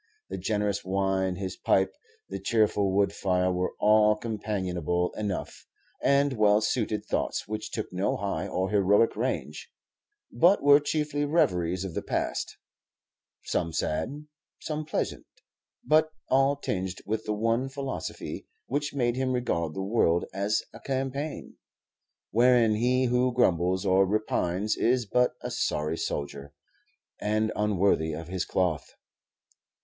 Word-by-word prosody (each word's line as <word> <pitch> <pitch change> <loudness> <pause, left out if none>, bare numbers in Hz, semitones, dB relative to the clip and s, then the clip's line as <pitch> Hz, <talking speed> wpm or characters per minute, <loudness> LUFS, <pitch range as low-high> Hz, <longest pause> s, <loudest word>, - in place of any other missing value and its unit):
The - - -4
generous 105 -2 -1
wine, 95 0 0
his 95 -1 -4
pipe, 95 0 +1 0.3
the 95 - -5
cheerful 105 -1 +2
wood 100 +1 +2
fire, 90 -1 +1
were 90 0 -2
all 105 0 +5
companionable 95 -6 -2
enough, 105 -3 -4 0.3
and 140 0 +3
well 105 -3 +4
suited 110 -1 -1
thoughts - - -2
which 110 0 -4
took 110 - -5
no 95 +2 0
high 100 -2 -2
or 95 0 -2
heroic 105 +2 +3
range, 75 - -3 0.6
but 175 +10 +4
were 145 0 +7
chiefly 145 0 -1
reveries 95 - +1
of 95 - -5
the - - -2
past, - - -3 0.9
some 85 - -1
sad, 125 - -2 0.3
some 155 0 -4
pleasant, 155 - -3 0.6
but 155 +1 +4 0.2
all 135 +2 +4
tinged 95 -7 -4
with 110 +2 -2
the 105 - -1
one 115 +4 0
philosophy, 135 -1 -5 0.2
which 145 +1 -2
made 120 -3 +1
him 130 0 0
regard 85 -11 -1
the 95 - -3
world 95 -5 +2
as 100 +2 0
a - - -11
campaign, 135 +3 -4 0.7
wherein 120 0 +4
he 125 +4 +2
who 125 +1 +2
grumbles 95 -5 +2
or 95 0 +4
repines 105 -1 0
is 125 0 +1
but 125 +5 +2
a - - -5
sorry 75 +2 -1
soldier, 70 -2 -4 0.7
and 110 +1 0
unworthy 100 -6 +1
of 80 +2 -7
his 95 0 -2
cloth. 90 -5 -1
105 Hz, 135 wpm, -27 LUFS, 95-125 Hz, 0.9 s, were